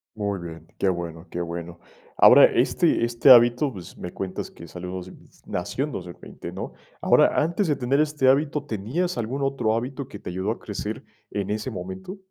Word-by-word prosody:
Muy 100 -2 -2
bien, 80 -2 -9
qué - - 0
bueno, 85 -2 -3
qué 90 - -4
bueno, 85 0 -6 0.4
ahora, - - +9
este - - +2
este 120 +3 +3
hábito, 120 +3 +6
pues, 90 -3 -10
me 90 - -7
cuentas 95 -1 -5
que 85 - -12
salió 90 +2 -8
dos 90 0 -6 0.3
nació 90 +9 -3
en 150 - -3
2020, 90 -6 -8
¿no?, - - -5 0.3
ahora, - - +4
antes 170 +5 0
de 150 - +2
tener 135 +2 0
este 150 -3 +2
hábito, 145 +2 +2
¿tenías 140 - -2
algún 120 +4 -3
otro 135 -5 0
hábito 130 +3 -4
que - - -9
te - - -7
ayudó 95 +4 -2
a - - -5
crecer - - -5 0.3
en 100 -1 -3
ese 110 +4 -2
momento? 95 - -7
110 Hz, 185 wpm, -24 LUFS, 90-135 Hz, 0.4 s, ahora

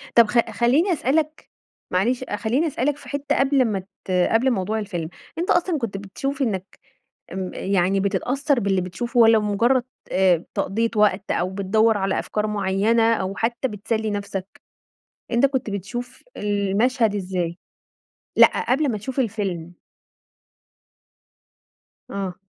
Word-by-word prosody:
طب 235 -2 +7
خ 240 - +2
خليني 250 - +2
أسألك 305 +1 -1 0.4
معلش 235 +8 +1
خليني 240 +9 0
أسألك 285 0 -1
في - - -13
حتة 285 0 -1
قبل 270 -1 +3
ما 210 -4 -1 0.3
ت - - -5 0.2
قبل 245 +4 +3
موضوع 215 0 -1
الفيلم، 175 -6 -4 0.3
أنت 345 +2 -2
أصلًا 350 -1 +2
كنت 230 -7 -3
بتشوف 270 +8 -4
إنك 195 -7 -2 0.5
آمم 185 0 -4
يعني 195 0 +1
بتتأثّر 245 +8 0
باللي 195 -3 +1
بتشوفه 235 +8 -2
والَّا 225 -1 +7
بمجرد 230 +5 +2 0.3
آآ 185 -3 +3
تقضية 230 +3 0
وقت، 210 -2 +2
أو 180 +1 0
بتدوّر 205 +3 +2
على 195 -1 0
أفكار 210 0 -2
معيّنة، 210 +3 +2
أو 190 -2 -2
حتى 235 +4 -1
بتسلي 220 0 -2
نفسك؟ 200 -1 -5 0.7
أنت 235 +3 +4
كنت 265 -5 -1
بتشوف 220 +6 -6
المشهد 210 +3 +1
إزاي؟ 180 -3 -2 0.8
لأ - - +5
قبل 275 +1 +2
ما 215 - -2
تشوف 260 +6 -5
الفيلم. 195 -8 -2 2.4
آه. 195 -2 -4
215 Hz, 135 wpm, -23 LUFS, 195-250 Hz, 2.4 s, طب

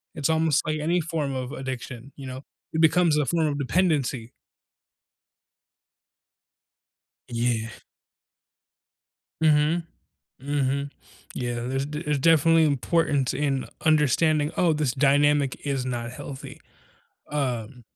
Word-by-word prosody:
It's 145 -2 -1
almost 160 -2 +2
like 155 0 -1
any 170 +4 +1
form 155 -4 -3
of 130 0 -4
addiction, 130 -2 -6
you 140 - -9
know? 130 +2 -7 0.3
It 160 - +1
becomes 160 -1 +4
a 150 - +2
form 160 +4 +1
of 145 -1 -2
dependency. 140 -6 0 3.0
Yeah. 115 -1 -1 1.7
Mhm, 155 +2 +3 0.6
mhm. 140 0 -1 0.4
Yeah, 120 -1 -3
there's 135 +3 -2
d 150 +2 -5
there's 150 -3 0
definitely 165 +2 +5
importance 145 -1 +1
in 135 -1 -1 0.2
understanding, 155 0 +3
"Oh, 170 -3 +3
this 150 -5 0
dynamic 145 0 +2
is 135 -3 -1
not 120 -2 -3
healthy." 135 +1 -9 0.7
Um 125 -4 -3
145 Hz, 110 wpm, -25 LUFS, 130-155 Hz, 3.0 s, definitely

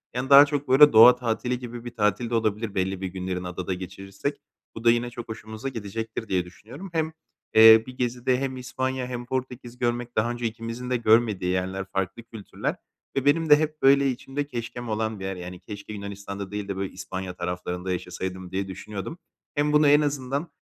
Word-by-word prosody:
Yani, 125 +1 -2
daha 140 +1 +10
çok 145 -1 -3
böyle 140 +3 +7
doğa 115 +3 +9
tatili 125 +1 -2
gibi 120 -1 -8
bir 120 0 -8
tatil 105 +2 +1
de 120 - -1
olabilir 110 -1 -1
belli 95 0 -1
bir 95 - -2
günlerini 90 0 -4
adada 90 +1 -3
geçirirsek. 95 +2 -6 0.3
Bu 115 - -8
da 115 - +7
yine 120 +1 0
çok 120 0 -9
hoşumuza 110 +3 -6
gidecektir 115 -1 -5
diye 90 -3 0
düşünüyorum. 120 - -11
Hem, 160 -1 -1 0.4
eee, 110 0 +9
bir 130 - -10
gezide 125 +1 0
hem 135 -1 -3
İspanya 130 0 -3
hem 120 -1 -5
Portekiz 125 -1 -5
görmek, 120 0 -2
daha 115 +2 +1
önce 120 0 -4
ikimizin 115 +2 -5
de 125 - +1
görmediği 110 -5 +3
yerler, 95 +1 -2
farklı 95 +4 -2
kültürler 110 -3 -5 0.4
ve 135 - 0
benim 160 +3 +3
de 150 - +10
hep 155 0 -2
böyle 140 0 +5
içimde 135 +3 -4
keşkem 120 -2 -6
olan 110 -1 -2
bir 95 - -5
yer. 95 0 -3
Yani, 90 0 -8
keşke 100 +2 -9
Yunanistan’da 100 -1 -7
değil 105 -1 -4
de 100 - -3
böyle 95 -1 -3
İspanya 95 -1 -6
taraflarında 90 +1 -4
yaşasaydım 90 0 -5
diye 95 +1 -2
düşünüyordum. 100 - -7 0.4
Hem 150 +1 +1
bunu 150 0 +5
en 145 +1 +6
azından, 140 +1 -2
115 Hz, 190 wpm, -25 LUFS, 95-125 Hz, 0.4 s, daha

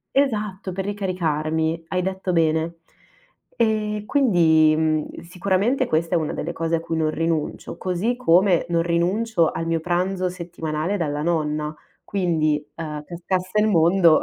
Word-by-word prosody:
Esatto, 210 -8 0
per 190 +1 -4
ricaricarmi, 165 -5 -1
hai 185 0 0
detto 190 0 -2
bene. 165 0 +1 0.8
E 215 -2 0
quindi, 165 - +4
mhmm, 155 -1 -1
sicuramente 195 +9 0
questa 165 +2 0
è - - +5
una 155 -2 -2
delle 170 +2 -4
cose 165 0 -1
a 165 - 0
cui 165 0 -4
non 155 -1 +1
rinuncio, 165 -1 -2
così 190 +7 -1
come 185 -6 +3
non 170 -1 +2
rinuncio 175 +2 +1
al 165 - -4
mio 165 0 0
pranzo 180 +2 -1
settimanale 170 0 -3
dalla 150 -4 -2
nonna. 155 -2 -1 0.3
Quindi, 155 -6 0
uhm, 150 -2 -5
cascasse 185 +3 -2
il 215 - +3
mondo 170 -2 +5
170 Hz, 145 wpm, -23 LUFS, 160-190 Hz, 0.8 s, è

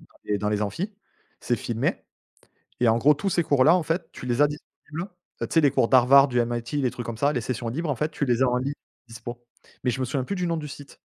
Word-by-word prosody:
dans - - -18 0.2
des 105 -1 -1
dans 105 +1 -1
les 105 0 0
amphis, 175 - -3 0.5
c'est 120 - 0
filmé. 115 +1 -2 0.8
Et 120 - +4
en 115 +1 +4
gros, 150 +5 +5
tous 195 +7 -2
ces 175 - +2
cours-là, 145 +1 +4
en 180 - 0
fait, 165 +2 -2
tu - - -9
les 120 +2 0
as - - +7
disponibles, 155 +4 -8 0.3
tu - - -1
sais 165 - +4
les 145 -3 +4
cours 115 - +2
d'Harvard, 135 +2 +6
du 125 -2 0
MIT, 120 +3 -4
les 125 - +2
trucs 120 -1 -7
comme 115 - -5
ça, 140 +5 +2
les 125 - -1
sessions 120 0 -3
libres, 155 +7 -2
en 140 - -1
fait, 150 +5 -1
tu 150 - -2
les 125 -1 +2
as 130 - +4
en 125 0 +1
libre 140 +3 -3 0.3
dispo. 120 +1 -9 0.4
Mais, 125 - +3
je 125 - -3
me - - +1
souviens 130 +1 -2
plus 200 - -3
du 180 -1 -1
nom 170 -1 0
du 150 -1 -5
site. 140 -1 -11
130 Hz, 270 wpm, -25 LUFS, 120-150 Hz, 0.8 s, as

